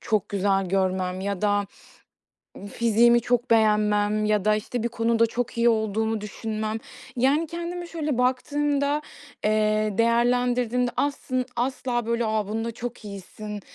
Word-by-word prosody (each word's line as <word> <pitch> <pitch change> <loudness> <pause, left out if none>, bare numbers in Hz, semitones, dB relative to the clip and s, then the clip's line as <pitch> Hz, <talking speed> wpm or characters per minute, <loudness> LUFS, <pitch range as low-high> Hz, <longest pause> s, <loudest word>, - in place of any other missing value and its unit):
çok 215 -4 0
güzel 195 -1 +1
görmem 185 -1 0
ya 200 0 -3
da 205 -1 +2 1.1
fiziğimi 235 +1 +4
çok 240 0 0
beğenmem 210 -1 +3
ya 210 -1 +1
da, 215 0 +4
işte, 225 +2 -3
bir - - +1
konuda 230 0 +2
çok 235 +1 -4
iyi 235 0 +4
olduğumu 220 0 0
düşünmem. 215 +1 -4 0.4
Yani, 280 +6 +2
kendime 345 +1 -5
şöyle 305 -6 -2
baktığımda, 285 +3 +1 0.4
eee, 215 0 +2
değerlendirdiğimde 245 +1 +2
aslın 255 -3 -1
asla 245 -1 -1
böyle 235 0 0
a 215 -2 0
"Bunda 225 +2 -2
çok 235 -1 -7
iyisin." 205 +1 -8
225 Hz, 130 wpm, -25 LUFS, 210-245 Hz, 1.1 s, fiziğimi